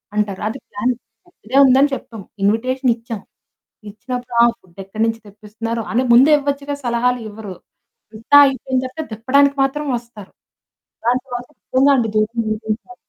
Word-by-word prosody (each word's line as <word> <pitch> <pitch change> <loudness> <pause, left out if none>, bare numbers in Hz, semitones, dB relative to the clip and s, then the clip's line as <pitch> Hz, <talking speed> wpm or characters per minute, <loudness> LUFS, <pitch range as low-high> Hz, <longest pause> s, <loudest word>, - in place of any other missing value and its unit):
అంటారు. 205 -2 -1
అది 240 +5 -5
ప్లాన్ 210 +5 -1 0.3
ముందే 355 - -28
ఇదే 260 +4 0
ఉందని 270 +2 +4
చెప్పాం. 225 -5 -10 0.2
ఇన్విటేషన్ 250 +5 +1
ఇచ్చాం. 230 -3 -7 0.7
ఇచ్చినప్పుడు, 245 +3 -6
ఆ - - +8
ఫుడ్ 185 0 -27
ఎక్కడి 215 +3 -4
నుంచి 225 0 -2
తెప్పిస్తున్నారు. 220 +3 -5
అని 250 +3 +2
ముందే 265 +6 +7
ఇవ్వచ్చుగా 285 0 -3
సలహాలివ్వరు. 235 -4 -2 0.6
అంతా 225 +6 +2
అయిపోయిన 265 -1 -1
తర్వాత 285 +5 -5
దెప్పడానికి 280 +6 +2
మాత్రం 295 +2 -1
వస్తారు. 235 -4 -11 0.7
దాని 245 +2 +2
తర్వాత 245 -1 -6
నిజంగాండి 260 -3 +2
దూరంగా 220 +6 -2
240 Hz, 135 wpm, -19 LUFS, 220-265 Hz, 0.7 s, ఆ